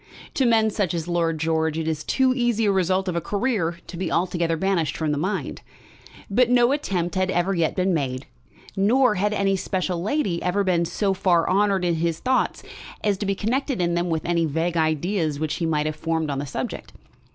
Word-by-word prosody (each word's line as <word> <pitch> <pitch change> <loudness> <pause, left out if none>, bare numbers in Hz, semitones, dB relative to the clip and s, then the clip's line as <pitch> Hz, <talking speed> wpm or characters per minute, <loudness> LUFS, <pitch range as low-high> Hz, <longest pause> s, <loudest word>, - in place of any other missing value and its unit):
To 265 - +2
men 220 -2 +3
such 190 -5 -1
as 165 0 -3
Lord 170 -2 0
George 160 0 0
it 160 -1 -2
is 155 -1 -2
too 260 -1 +2
easy 240 -3 +1
a 205 - +3
result 190 0 +1
of 180 - -1
a 170 - 0
career 200 -3 -1
to 175 - -9
be 185 - -3
altogether 170 -1 0
banished 185 -3 0
from 155 -2 -1
the 145 - -1
mind. 190 +6 -3 0.7
But 240 +4 +3
no 245 0 +4
attempt 185 - -1
had 185 -1 0
ever 185 +1 +1
yet 170 -3 0
been 185 0 +1
made, 135 -4 -2 0.5
nor 235 +5 +3
had 210 +2 0
any 200 -2 +1
special 185 -2 -2
lady 195 - -1
ever 200 +3 +1
been 175 -3 +1
so 195 +3 0
far 180 -3 +2
honoured 195 -1 +2
in 170 -2 +1
his 165 0 0
thoughts 260 +5 0 0.4
as 205 -2 +2
to 205 - -2
be 195 - +1
connected 250 +5 -1
in 175 -1 +1
them 175 +1 0
with 160 -1 -2
any 170 -1 +1
vague 165 +3 -1
ideas 160 0 0
which 155 -1 -2
he 165 - -1
might 150 -2 0
have 155 0 -2
formed 160 -1 -2
on 135 - -2
the 145 - -4
subject. - - -5
180 Hz, 210 wpm, -23 LUFS, 165-200 Hz, 0.7 s, no